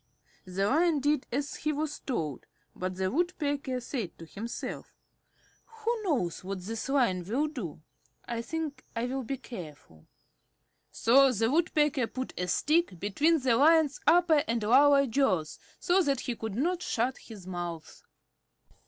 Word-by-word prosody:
The 185 +2 -1
Lion 315 +4 +3
did 290 0 +1
as 280 +3 -2
he 305 - -1
was 300 0 -3
told, 155 - -4 0.3
but 185 0 -3
the 185 0 -1
Woodpecker 290 -5 -1
said 235 - -5
to 165 - -10
himself: 220 +8 -6 0.9
"Who 470 +2 +1
knows 260 - -1
what 195 +1 -4
this 225 +6 -5
Lion 235 -10 +2
will 240 - 0
do? 205 - -6 0.4
I 235 -1 -3
think 310 +3 -5
I 230 +1 -1
will 265 +2 -2
be 265 +3 -4
careful." 155 - -11 0.8
So 270 +3 +5
the 225 0 +1
Woodpecker 295 -5 +2
put 260 +2 -5
a 180 - -2
stick 300 - +1
between 290 - +2
the 250 -3 +3
Lion's 310 +2 +4
upper 335 -4 +5
and 230 -1 -1
lower 275 +5 +6
jaws 215 - 0 0.2
so 370 +2 +3
that 280 -6 0
he 245 - -3
could 220 -3 -5
not 345 +8 0
shut 250 -4 -1
his 210 -6 -12
mouth. 175 -3 -6
255 Hz, 150 wpm, -29 LUFS, 195-295 Hz, 0.9 s, lower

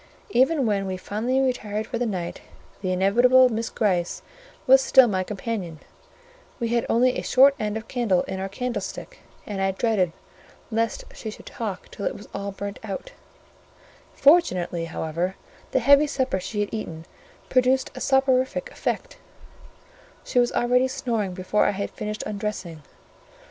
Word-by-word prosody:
Even 270 +1 +3
when 200 -3 0
we 185 -1 -3
finally 225 +7 -1
retired 220 -5 -1
for 235 +1 -4
the 245 - 0
night, 180 -5 -4 0.4
the 185 -2 -1
inevitable 245 +8 +5
Miss 230 0 -2
Gryce 180 -5 -1 0.4
was 265 +1 +7
still 265 -1 +6
my 190 -4 0
companion: 195 -4 -4 0.8
we 235 -2 -1
had 235 0 0
only 250 +2 +3
a - - -2
short 270 +2 +5
end 210 0 -2
of 220 - -8
candle 220 -8 +1
in 190 - -5
our 195 +1 -3
candlestick, 250 - -5 0.3
and 200 -2 -4
I 195 - +2
dreaded 190 -3 +1 0.6
lest 225 0 -1
she 220 - -6
should 215 - -11
talk 205 -6 -5
till 200 - -3
it - - -3
was 205 - -11
all 200 0 -4
burnt 200 +1 -6
out; 220 - -6 1.0
fortunately, 185 - +3
however, 165 +3 -3 0.3
the - - 0
heavy 280 +4 +6
supper 260 -8 -1
she 205 +3 -3
had 205 - -3
eaten 165 -7 -5 0.4
produced 255 +1 +2
a 255 - -8
soporific 265 - +1
effect: - - -3 1.1
she 250 - +1
was 240 0 +3
already 250 +2 +2
snoring 230 -8 -2
before 185 +3 +1
I - - +3
had 200 - -3
finished 210 0 -5
undressing. 200 -6 -4
220 Hz, 155 wpm, -24 LUFS, 195-255 Hz, 1.1 s, was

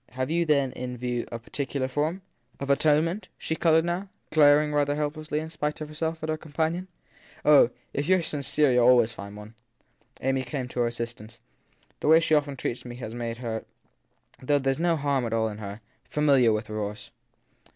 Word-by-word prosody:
Have 130 +3 -2
you 170 +1 +2
then 140 -3 +3
in 125 0 -6
view 120 -1 -2
a 115 - -3
particular 135 +3 -3
form? 155 +8 -2 0.4
Of 140 0 -1
atonement? 155 +7 +2
She 160 - -3
coloured 160 0 +3
now, 180 +3 -2 0.2
glaring 150 0 +5
rather 145 0 +2
help 150 0 -1
lessly, 155 -1 -4
in 160 +1 -6
spite 150 -1 -3
of 155 -1 -6
herself, 160 +1 -3
at 155 - -3
her 155 - 0
companion. 160 +4 -2 0.6
Oh, 145 -5 +7 0.2
if 145 +4 -2
you 185 - +7
re 180 - 0
sincere 145 -2 +1
you 125 - +4
ll - - +5
always 120 -2 +5
find 100 -2 -9
one. 105 +1 -11 0.7
Amy 135 0 0
came 130 0 -4
to 125 - -5
her 120 - +3
assistance. 115 -2 -6 0.6
The - - -2
way 160 +1 +8
she 160 -1 0
often 145 -2 +2
treats 120 - -3
me 120 -1 -8
has 120 -3 -7
made 115 -1 -4
her 115 -2 -4 0.8
though 145 +3 +2
there 135 -1 +1
s 135 - -2
after 170 +2 0
all 165 - +3 0.3
no 120 - -2
harm 110 -1 +1
in 105 - -8
her 100 +1 -7 0.3
fa - - -4
miliar 135 -6 +5
with 110 0 -1
remorse. 105 0 -5
140 Hz, 205 wpm, -26 LUFS, 120-155 Hz, 0.8 s, way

